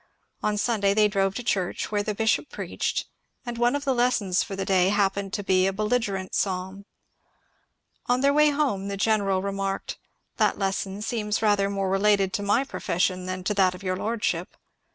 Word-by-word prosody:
On 210 0 0
Sunday 205 -3 +1
they 210 -1 +5
drove 195 -1 0
to 245 - -4
church, 190 -4 -1
where 205 -1 +1
the 210 0 -3
bishop 225 +6 +1
preached, - - -3 0.4
and 240 -1 -5
one 240 +3 +3
of 285 0 -3
the 270 - +2
lessons 240 -7 +1
for 200 - -4
the 195 - -3
day 185 -1 +3
happened 200 -1 0
to 205 - -2
be 185 -1 +3
a - - +1
belligerent 210 -2 -1
psalm. 190 +1 -2 1.2
On 245 +1 +2
their 280 +1 +4
way 300 +1 +5
home 280 -10 0
the 200 0 -4
general 195 -2 +1
remarked, 195 0 -3 0.4
^^ - - -41
That - - +2
lesson 195 +1 -2
seems 215 -2 -2
rather 205 -2 +3
more 195 -1 -1
related 195 -1 +2
to - - -1
my 205 +6 +2
profession 185 -7 -1
than 185 0 -4
to 210 - 0
that 190 -2 +3
of 180 - -12
your 185 -1 -1
lordship." 220 +3 -2
200 Hz, 190 wpm, -25 LUFS, 195-220 Hz, 1.2 s, they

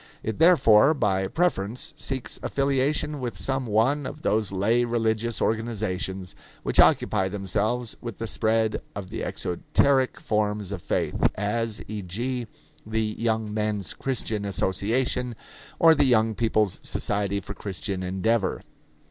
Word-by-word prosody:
It 110 -1 -3
therefore 150 -5 +6
by 95 -7 +1
preference 120 - -1
seeks 130 -2 -3
affiliation 140 +2 0
with 125 -2 -4
some 135 -2 -2
one 125 +7 +2
of 155 - -9
those 105 -2 +1
lay 110 +5 +2
religious 115 -1 0
organizations 100 -5 -2 0.3
which - - 0
occupy 95 0 +4
themselves 105 +5 -1
with 115 -3 -6
the 115 - -4
spread 110 0 +1
of 100 -1 -6
the 115 - -4
exoteric 130 +9 +1
forms 105 -2 -1
of 95 -4 -5
faith - - -1
as, 110 +2 -2
e.g., 110 +5 -4 0.4
the 110 0 -2
Young 110 -2 0
Men's 105 -4 -1
Christian 115 -5 -2
Association 115 +6 0 0.4
or 165 -1 +7
the 145 -2 +3
Young 110 -3 +3
People's 110 -3 +1
Society 100 -1 0
for - - -7
Christian 95 -1 -4
Endeavor. 95 +4 0
110 Hz, 130 wpm, -25 LUFS, 100-125 Hz, 0.4 s, or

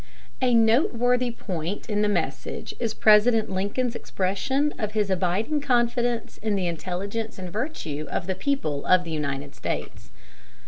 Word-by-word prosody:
A 250 -2 +4
noteworthy 245 +1 +3
point 185 -5 -4
in 210 -2 0
the 210 - +3
message 140 -9 -2
is 230 -2 0
President 215 +1 +5
Lincoln's 205 +6 -1
expression 265 +13 0
of 215 -2 -2
his 210 -3 +1
abiding 190 - 0
confidence 240 -3 0
in 215 -1 0
the 190 -2 0
intelligence 190 +6 -3
and 185 -2 -7
virtue 165 - -3
of 175 - -2
the 190 - -1
people 185 - -1
of 185 -1 +5
the 165 - -6
United 140 -2 -3
States. - - -5
210 Hz, 145 wpm, -25 LUFS, 180-240 Hz, -, President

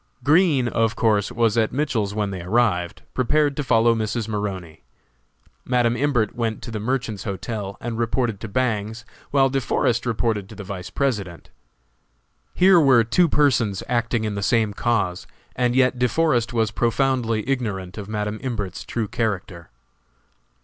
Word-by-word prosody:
Green, 150 -3 +4
of 115 -1 0
course, 105 -3 +1
was 115 -1 +2
at 110 - +1
Mitchell's 120 -8 -1
when 105 -2 -1
they 95 -2 -5
arrived, 90 -3 0
prepared 145 +3 +1
to 145 - -2
follow 115 -2 +4
Mrs. 110 0 -2
Maroney. 95 -7 -4 0.8
Madam 120 -2 +1
Imbert 120 -5 +1
went 115 -3 -2
to 115 - -6
the 110 - -4
Merchants's 115 -3 -2
Hotel 100 0 -5
and 120 -1 -4
reported 115 -2 -1
to 115 - -6
Bangs, 110 -1 -2 0.2
while 135 -1 +4
De 135 0 -1
Forest 120 0 0
reported 110 -4 -1
to - - -11
the 100 - -8
Vice 95 -2 -7
President. 105 -11 -3 1.0
Here 185 -1 +6
were 130 -6 +5
two 165 +9 +2
persons 115 -10 +2
acting 120 -1 0
in 105 -1 -2
the 100 - -3
same 110 +1 +1
cause, 105 -6 -1 0.3
and 125 0 +1
yet 130 -1 +3
De 125 0 +2
Forest 130 -5 +1
was 110 -2 0
profoundly 120 -1 0
ignorant 105 -8 -3
of 100 0 -8
Madam 105 0 -3
Imbert's 105 -8 -4
true 115 -3 -3
character. 95 -6 -3
115 Hz, 155 wpm, -22 LUFS, 105-125 Hz, 1.0 s, Here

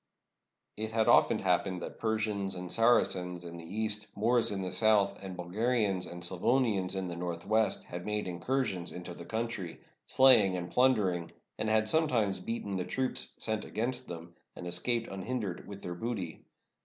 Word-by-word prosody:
It 110 +1 -4
had 110 -1 +2
often - - +5
happened 90 -2 0
that - - -7
Persians 105 -3 -1
and 90 0 -6
Saracens 90 -6 +2
in 85 0 -8
the 85 - -9
east, 105 +4 -1
Moors 115 +3 +3
in 95 -2 -3
the 90 - -3
south, 105 -3 +4
and 95 -2 -7
Bulgarians 100 +1 0
and 85 0 -8
Sla 85 +1 +2
vonians 110 -8 +2
in 95 -1 -2
the 85 - -5
northwest 90 +6 0
had 90 0 -7
made 105 -1 -2
incursions 90 0 -2
into 90 0 -7
the - - -10
coimtry, 110 -6 -4 0.3
slaying 110 -8 +6
and 85 0 -5
plundering, 95 -8 +2 0.3
and 110 - 0
had 110 0 +2
sometimes 115 - +2
beaten 100 0 -4
the 90 - -1
troops 130 +6 -1
sent 110 -2 -1
against 125 +3 -3
them, 85 0 -8 0.2
and - - -8
escaped 115 +7 0
unhin 95 +7 -4
dered 95 -6 -5
with 100 -1 -9
their 90 - -4
booty. 95 -4 -5
100 Hz, 170 wpm, -31 LUFS, 90-115 Hz, 0.3 s, slaying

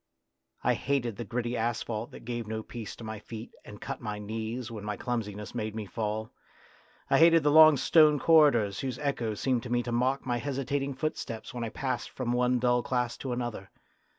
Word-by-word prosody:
I - - +3
hated 125 -6 -1
the 120 - -4
gritty 120 +1 -2
asphalt 115 -1 -2
that - - -12
gave 120 -2 -4
no 110 0 -4
peace 115 -2 -7
to - - -11
my 110 -1 -5
feet 110 +2 -9
and - - -11
cut - - -6
my 105 0 -4
knees 110 +3 -4
when 110 -3 -7
my 105 -1 -3
clumsi 115 -5 -3
ness 105 0 -8
made 110 -2 -3
me 110 -1 -4
fall. 110 +2 -3 0.8
I - - +5
hated 165 -1 +6
the 145 - +4
long 155 -1 +8
stone 150 +2 +5
corridors 140 -11 +4
whose 130 -2 -3
echoes 120 -7 -2
seemed 130 -3 +1
to 125 - -8
me 120 0 +1
to 120 - -4
mock 130 +3 +1
my 120 -2 0
hesitating 140 +1 -2
footsteps 130 -5 -4
when 120 -1 -4
I 115 - -2
passed 130 +3 -3
from 120 -2 -2
one 125 +1 +2
dull 125 0 +2
class 125 -1 -1
to 130 - -5
another. 120 -5 -4
120 Hz, 205 wpm, -29 LUFS, 110-130 Hz, 0.8 s, long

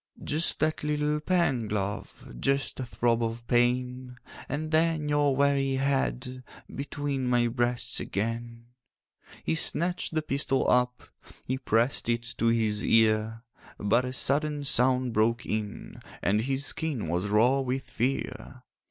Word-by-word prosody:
'Just 155 +3 +1
that 155 +1 0
little 150 0 0
pang, 150 -9 +1
love, 100 -9 -4
Just 135 0 0
a 130 - -2
throb 120 0 +1
of 115 0 -3
pain, 125 +1 0 0.3
And 155 +3 -3
then 160 -1 +2
your 145 -2 +2
weary 140 -1 +2
head 130 - -1 0.3
Between 140 -1 -3
my 120 -1 +3
breasts 120 0 -1
again.' 115 +3 -4 0.8
He - - 0
snatched 170 +1 -1
the 155 - +1
pistol 135 -2 0
up, 125 0 +2 0.4
He 130 +1 -2
pressed 120 0 +1
it 115 0 +1 0.2
to 115 - +2
his 110 -2 +1
ear; 110 0 +2 0.3
But 115 +5 +2
a 125 - -3
sudden 145 +3 0
sound 130 -2 +2
broke 115 +2 +1
in, 110 -1 -4 0.2
And 105 +3 +2
his 135 +3 -1
skin 150 - -1
was 90 +5 -1
raw 115 +6 +4
with 130 0 -2
fear. 125 +1 -3
125 Hz, 135 wpm, -28 LUFS, 115-140 Hz, 0.8 s, raw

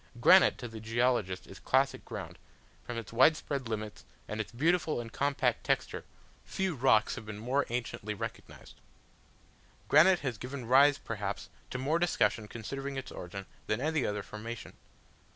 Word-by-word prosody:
Granite 185 +9 +7
to 120 - -6
the 110 -1 -8
geologist 110 -5 0
is 95 - -12
classic 135 +1 +1
ground: - - -7 0.4
from 120 - -5
its 115 -1 -7
widespread 140 0 +3
limits, 110 -1 -5 0.2
and 105 +1 -2
its 110 - -8
beautiful 160 +4 +1
and 115 -1 -7
compact 140 0 0
texture, - - -1 0.4
few 190 -2 -2
rocks 120 -6 +3
have 115 - -7
been 110 -1 -6
more 130 +6 0
anciently 115 -3 -3
recognised. - - -8 1.1
Granite 185 +2 +6
has 125 -6 -3
given 130 0 -6
rise, 135 +4 +6
perhaps, 105 -3 -5 0.2
to - - -4
more 145 +6 +1
discussion 170 -10 +1
concerning 135 +5 -5
its 135 - -6
origin 95 +2 -7 0.2
than 110 - 0
any 155 0 0
other 105 -1 -2
formation. 115 +2 -7
120 Hz, 150 wpm, -31 LUFS, 110-140 Hz, 1.1 s, Granite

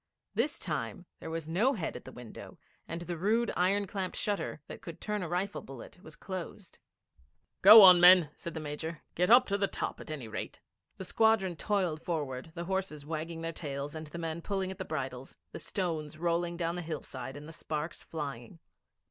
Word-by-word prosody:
This - - 0
time 180 -4 -4
there - - -7
was 160 -1 -4
no 210 +12 +2
head 180 -10 -3
at 125 - -8
the - - -9
window, 120 -2 -10 0.3
and 165 +1 -5
the 175 -1 -5
rude 225 +5 +2
iron 195 +3 +2
clamped 190 -1 -4
shutter 205 -6 -2
that - - -9
could 170 - -9
turn 210 -1 -2
a 175 - -4
rifle 185 +4 -1
bullet 135 +6 -11
was 155 -4 -12
closed. 185 0 -7 0.8
'Go 210 +2 +12
on, 180 -2 +10
men,' 180 -4 +8
said 170 - -7
the - - -2
Major. 155 +2 -5
'Get 180 +3 +1
up 250 +2 +8
to 200 0 -1
the 200 - +2
top - - -4
at - - -10
any 145 -7 -5
rate.' 110 - -6 0.4
The - - -6
squadron 220 -5 +3
toiled 180 -4 0
forward, 145 -4 -3
the 170 - -4
horses 185 -6 -3
wagging 165 +1 -4
their 165 0 -2
tails 140 -2 -5
and 155 -1 -6
the 150 - -8
men 165 0 -3
pulling 190 0 -2
at 190 - -9
the - - -3
bridles, 135 -4 -5
the - - -7
stones 160 -6 -3
rolling 170 +1 0
down 170 0 -1
the 180 - -3
hillside 140 -5 -6
and 145 +1 -10
the 165 - -9
sparks 155 0 -4
flying. 140 -4 -6
170 Hz, 200 wpm, -31 LUFS, 155-190 Hz, 0.8 s, Go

